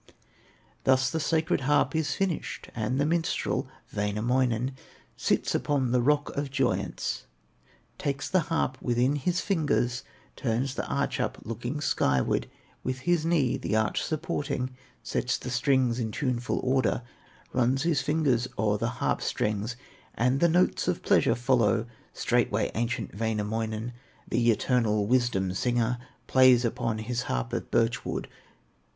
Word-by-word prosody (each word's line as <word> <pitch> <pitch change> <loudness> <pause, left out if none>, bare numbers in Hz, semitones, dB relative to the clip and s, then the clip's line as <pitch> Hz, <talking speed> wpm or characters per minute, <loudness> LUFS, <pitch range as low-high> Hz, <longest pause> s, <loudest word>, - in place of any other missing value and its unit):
Thus 130 -1 +3
the 160 - -1
sacred 160 -2 +1
harp 145 +4 +2
is 160 -2 0
finished, 190 -5 -3
And 120 +4 -1
the 145 - +3
minstrel, 165 +1 0 0.3
Wainamoinen, 120 +4 +1 0.4
Sits - - 0
upon 135 -4 +1
the 125 0 +3
rock 145 +3 +1
of 140 0 -2
joyance, 135 -2 -1 0.7
Takes 140 -1 -2
the 185 - +3
harp 130 -6 0
within 125 +3 +2
his 175 +5 0
fingers, 145 -9 0 0.3
Turns 125 +2 -1
the - - -3
arch - - -1
up, - - -1
looking 120 +6 -4
skyward; 65 - +1 0.3
With 130 0 -3
his 170 +1 +1
knee 135 -7 +2
the 110 - -2
arch 110 0 +1
supporting, 145 -4 -2 0.3
Sets 130 +1 -1
the 125 - -6
strings 125 -1 +2
in 115 -2 -1
tuneful 125 -1 -1
order, 130 -2 +1 0.5
Runs 130 +2 +2
his 160 -5 +2
fingers 135 -4 +1
o'er 105 -1 +1
the 115 - 0 0.2
harp - - +1
strings, 105 +2 -1 0.4
And 125 +3 +2
the 170 - +4
notes 180 +3 +2
of - - -1
pleasure - - +4
follow. 115 -3 +2 0.3
Straightway - - +1
ancient 120 +2 -2
Wainamoinen, 110 +1 -2 0.3
The 120 0 +2
eternal 110 -2 +2
wisdom 115 -6 +1
singer, 120 +3 0 0.3
Plays 130 -2 +6
upon 115 -1 -1
his 120 +3 -2
harp 120 0 -2
of 120 - -3
birch 115 0 +1
wood. - - -3
125 Hz, 140 wpm, -28 LUFS, 115-140 Hz, 0.7 s, Plays